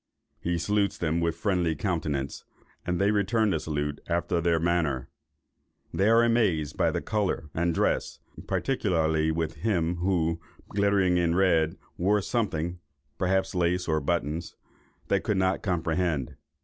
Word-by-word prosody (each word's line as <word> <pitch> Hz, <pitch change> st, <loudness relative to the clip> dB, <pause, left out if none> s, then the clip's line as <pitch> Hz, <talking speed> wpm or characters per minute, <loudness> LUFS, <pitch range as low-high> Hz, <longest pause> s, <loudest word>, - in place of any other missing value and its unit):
He 85 Hz, 0 st, -1 dB
salutes 100 Hz, +4 st, 0 dB
them 85 Hz, 0 st, 0 dB
with 85 Hz, -1 st, 0 dB
friendly 90 Hz, -6 st, +1 dB
countenance, 75 Hz, -6 st, -2 dB, 0.4 s
and 90 Hz, -1 st, 0 dB
they 100 Hz, +1 st, +3 dB
return 105 Hz, +1 st, +2 dB
the 80 Hz, -, +1 dB
salute 75 Hz, -2 st, -3 dB
after 85 Hz, 0 st, 0 dB
their 85 Hz, -1 st, +2 dB
manner. 80 Hz, -6 st, 0 dB, 0.8 s
They 100 Hz, +3 st, +2 dB
are 115 Hz, +1 st, +6 dB
amazed 105 Hz, -11 st, +1 dB
at -, -, +3 dB
their -, -, -2 dB
colour 100 Hz, -8 st, -1 dB
and 85 Hz, +1 st, +1 dB
dress, 80 Hz, -, 0 dB, 0.3 s
particularly 80 Hz, -11 st, +1 dB
with 80 Hz, 0 st, -2 dB
him 85 Hz, -2 st, 0 dB
who, 85 Hz, -2 st, 0 dB, 0.3 s
glittering 100 Hz, -3 st, +2 dB
in 85 Hz, -1 st, +2 dB
red, 85 Hz, -4 st, +3 dB, 0.2 s
wore 100 Hz, +4 st, +3 dB
something 90 Hz, -7 st, -1 dB, 0.4 s
(perhaps 95 Hz, +1 st, +1 dB
lace, 90 Hz, 0 st, +1 dB
or 80 Hz, -1 st, +1 dB
buttons) 80 Hz, +1 st, -2 dB, 0.5 s
they -, -, +2 dB
could 105 Hz, -, -1 dB
not 95 Hz, 0 st, +1 dB
comprehend. 85 Hz, -5 st, -1 dB
85 Hz, 140 wpm, -27 LUFS, 80-95 Hz, 0.8 s, are